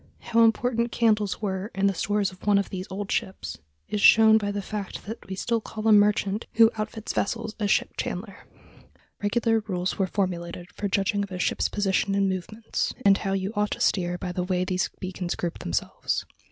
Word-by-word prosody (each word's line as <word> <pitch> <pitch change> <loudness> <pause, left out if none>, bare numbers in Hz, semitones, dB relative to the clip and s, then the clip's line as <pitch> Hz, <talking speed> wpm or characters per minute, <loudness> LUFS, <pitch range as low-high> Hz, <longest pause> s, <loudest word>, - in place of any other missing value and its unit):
How 230 -1 +3
important 235 +1 +2
candles 215 -3 +1
were 190 0 -2
in 195 +1 +1
the 200 - +3
stores 205 +2 0
of 185 +2 -14
one 205 -1 +5
of 200 - -1
these 185 0 -5
old 195 +1 -5
ships 90 - -3 0.3
is 210 - -2
shown 220 +1 +7
by 205 -1 -2
the 205 - -3
fact 205 -1 -5
that 220 +3 -7
we 190 - -3
still 230 +4 0
call 215 0 -5
a - - +6
merchant 205 0 +3
who 225 0 +6
outfits 215 0 -4
vessels 225 +1 -1
a 210 - +1
ship - - +2
chandler. 195 +2 -5 0.7
Regular 225 +2 +2
rules 180 0 -2
were 190 - +2
formulated 175 -2 -3
for 205 - -3
judging 200 +1 +1
of 200 -1 -4
a 180 - -4
ship's 180 - 0
position 195 0 +1
and 200 0 +2
movements, 190 +4 -3
and 195 0 +6
how 195 -1 -1
you 195 +2 -2
ought 210 0 +1
to - - -4
steer 175 -2 +1
by 180 0 -4
the 180 - -2
way 180 0 0
these 185 0 0
beacons 185 -1 -3
grouped 170 -1 -4
themselves. 85 - -2
200 Hz, 200 wpm, -26 LUFS, 185-215 Hz, 0.7 s, shown